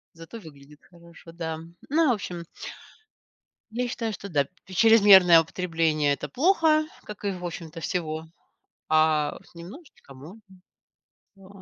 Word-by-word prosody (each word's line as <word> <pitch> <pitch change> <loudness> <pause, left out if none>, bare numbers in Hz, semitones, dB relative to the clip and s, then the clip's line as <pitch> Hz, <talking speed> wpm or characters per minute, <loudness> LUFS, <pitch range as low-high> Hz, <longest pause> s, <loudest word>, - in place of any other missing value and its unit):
зато 165 +8 -11
выглядит 150 -4 -16
хорошо, 170 -1 -17
да. 160 -2 -5 0.3
Но 315 0 +2
в - - +4
общем 175 -5 -6 1.3
Я 245 +2 -2
считаю, 230 -2 -4
что, 200 0 -8
да, 145 -5 0 0.2
чрезмерное 190 -4 +6
употребление- 165 -3 -1
это - - -6
плохо, 310 +1 +2 0.2
как 210 0 -10
и 200 - 0
в 180 -2 -8
общем-то 165 -1 -7
всего, 160 -2 -4 0.6
а 155 -1 +2
с - - -23
немножечко 175 - -13
можно, 155 +12 -13 1.0
да. 195 -1 -17
175 Hz, 130 wpm, -25 LUFS, 160-215 Hz, 1.3 s, чрезмерное